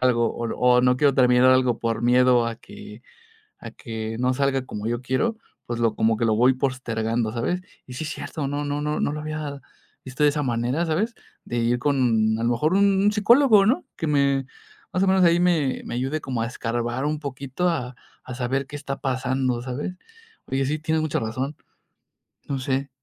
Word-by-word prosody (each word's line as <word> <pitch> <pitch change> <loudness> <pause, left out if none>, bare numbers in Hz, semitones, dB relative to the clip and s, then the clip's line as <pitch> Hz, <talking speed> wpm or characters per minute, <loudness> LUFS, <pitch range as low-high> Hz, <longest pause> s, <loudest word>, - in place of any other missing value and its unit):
algo 120 -2 +3
o 115 - -3
o 125 0 +4
no 125 0 +3
quiero 140 -1 +3
terminar 125 0 +5
algo 130 -2 +3
por 115 -1 -2
miedo 125 0 +4
a 115 -1 -4
que 105 +1 -12 0.6
a - - -9
que 110 -1 -6
no 125 +1 +1
salga 135 -1 0
como 105 -2 -5
yo 120 +1 -2
quiero, 215 - -1 0.3
pues, 120 -1 -4
lo 115 -2 +2
como 110 0 +2
que, 115 - -2
lo 110 -1 +2
voy 125 +3 +4
postergando, 115 -4 -2
¿sabes?, 175 +10 -1 0.2
y 125 - -10
sí, 155 +5 -5
es - - -4
cierto, 150 -3 -5
no 145 +1 -2
no 145 0 -2
no 150 0 -1
no - - 0
lo 150 - -4
había 150 -2 -5 0.5
visto 130 +3 -7
de 145 - +6
esa 150 0 -1
manera, 125 +6 0
¿sabes?, 200 +9 -1 0.3
de 120 - -4
ir 120 +1 +1
con, 120 -6 +2
a - - -2
lo 120 - +2
mejor, 150 +8 +1
un 200 +1 +3
psicólogo, 215 0 +5
¿no?, 245 +6 +1
que 160 - -4
me 140 -2 +2 0.5
más 185 - 0
o - - +2
menos 190 -1 +4
ahí 170 0 +5
me 165 -7 +1
me - - -5
ayude 135 +5 -2
como 125 -3 -3
a - - 0
escarbar 120 +2 -3
un 150 0 -1
poquito, 140 +4 -2
a 125 -6 -3 0.3
a 130 - -6
saber 130 +2 -2
qué 145 - -9
está 140 -1 -5
pasando, 130 -1 -1
¿sabes?, 140 +8 -4 0.5
oye, 135 0 -1
sí, 150 +3 -1
tienes 160 0 0
mucha 155 -2 -1
razón, 130 +6 -3 0.9
no 140 -1 -2
sé. 135 +1 -2
130 Hz, 205 wpm, -24 LUFS, 120-150 Hz, 0.9 s, de